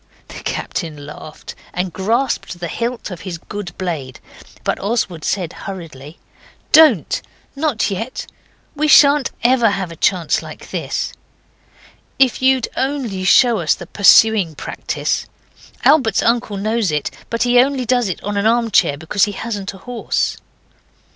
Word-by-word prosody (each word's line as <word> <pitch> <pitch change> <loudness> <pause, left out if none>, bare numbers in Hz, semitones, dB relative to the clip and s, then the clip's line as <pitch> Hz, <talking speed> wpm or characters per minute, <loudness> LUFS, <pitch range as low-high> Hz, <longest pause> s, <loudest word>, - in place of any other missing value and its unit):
The - - -9
captain 160 -5 -4
laughed 150 +1 -10 0.2
and 180 -1 -2
grasped 225 -1 -1
the 175 - -4
hilt 235 -2 -3
of 175 - -7
his 180 -3 -5
good 190 0 -8
blade. 155 -9 -4 0.4
But - - -1
Oswald 195 -6 -2
said 180 -4 -2
hurriedly 165 -6 -9 0.5
'Don't. 300 - +5 0.3
Not 275 -8 0
yet. 225 +7 -4 0.5
We 305 +1 +1
shan't 285 -2 +6
ever 240 -2 +4
have 190 -3 -3
a - - -9
chance 175 0 +1
like - - -11
this. - - -3 1.0
If 260 -2 +3
you'd 260 -1 +3
only 260 -9 -2
show 235 +4 +5
us 160 -3 +2
the 175 - -9
pursuing 200 -2 +5
practice! - - -3 0.6
Albert's 265 -8 +4
uncle 230 -3 +1
knows 215 -1 0
it; 150 -1 -2 0.2
but 230 - 0
he 245 0 +4
only 260 0 +2
does 245 -3 +1
it 180 - -5
on 205 0 -3
an 200 +2 +2
armchair, 230 -10 +2
because 160 +5 +1
he 205 - -5
hasn't 200 -2 -5
a 190 - -16
horse. 245 -1 -2
205 Hz, 145 wpm, -18 LUFS, 175-245 Hz, 1.0 s, shan't